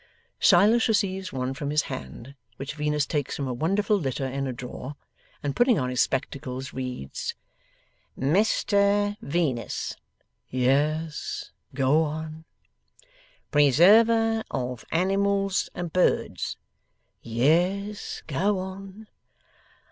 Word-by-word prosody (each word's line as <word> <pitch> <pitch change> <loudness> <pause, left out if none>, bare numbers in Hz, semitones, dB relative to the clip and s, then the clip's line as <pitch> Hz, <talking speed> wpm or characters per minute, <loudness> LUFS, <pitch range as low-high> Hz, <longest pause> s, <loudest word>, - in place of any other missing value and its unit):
Silas 210 +5 +5
receives 190 -4 0
one 130 0 -2
from 140 +1 -4
his 150 0 +2
hand, 95 - -8 0.2
which 135 +1 -5
Venus 150 -1 0
takes 145 -3 -2
from 140 - -3
a 125 - -2
wonderful 195 - +1
litter 135 -3 -2
in 135 +1 -2
a - - -2
drawer, 125 +3 -7 0.5
and 140 -1 -2
putting 245 -3 +4
on 125 -1 -1
his 125 - +2
spectacles, 130 0 -3
reads: 125 - -5 0.8
'"Mr 200 - +2
Venus,"' 140 -6 -2 0.5
'Yes. 150 +5 0 0.2
Go 140 +4 +3
on.' 160 +1 -4 1.1
'"Preserver 220 - +5
of 125 -2 -3
Animals 195 +2 +1
and 175 -2 -5
Birds,"' 180 - +1 0.6
'Yes. 175 - 0
Go 190 +8 0
on. 190 +3 -7
155 Hz, 105 wpm, -26 LUFS, 135-195 Hz, 1.1 s, Silas